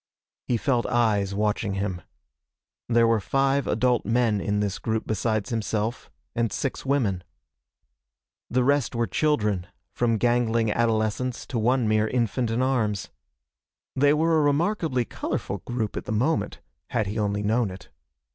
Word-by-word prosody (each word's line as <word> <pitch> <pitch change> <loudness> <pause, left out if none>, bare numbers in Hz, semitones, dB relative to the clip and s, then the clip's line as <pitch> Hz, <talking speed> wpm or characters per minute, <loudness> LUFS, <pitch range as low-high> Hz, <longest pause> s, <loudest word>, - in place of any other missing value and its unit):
He 120 - +2
felt 120 0 0
eyes 105 -5 +1
watching 105 -1 0
him. 95 -3 -2 0.9
There 115 -1 +4
were 115 -1 +3
five 135 +5 +1
adult 125 -2 +2
men 115 -3 +1
in 105 +1 0
this 100 -1 -1
group 110 -1 -2
besides 110 -1 -1
himself, 110 +1 -2 0.2
and 115 -3 0
six 135 +3 -3
women. 115 -10 0 1.3
The 125 +1 +2
rest 140 -2 +1
were 115 0 +1
children, 105 - 0 0.3
from 115 -2 +1
gangling 115 -1 +2
adolescents 115 +2 0
to 120 - -3
one 120 +1 +2
mere 110 0 +2
infant 120 0 0
in 115 +3 0
arms. 110 -7 0 0.8
They 145 +2 +4
were 160 +1 +3
a - - +3
remarkably 150 - +1
colorful 100 - -4
group 115 -4 -2
at - - -4
the - - -4
moment, 130 +9 0 0.3
had 115 -4 0
he 105 +3 -3
only 105 0 0
known 110 +1 +1
it. 90 -1 -11
115 Hz, 145 wpm, -25 LUFS, 105-125 Hz, 1.3 s, There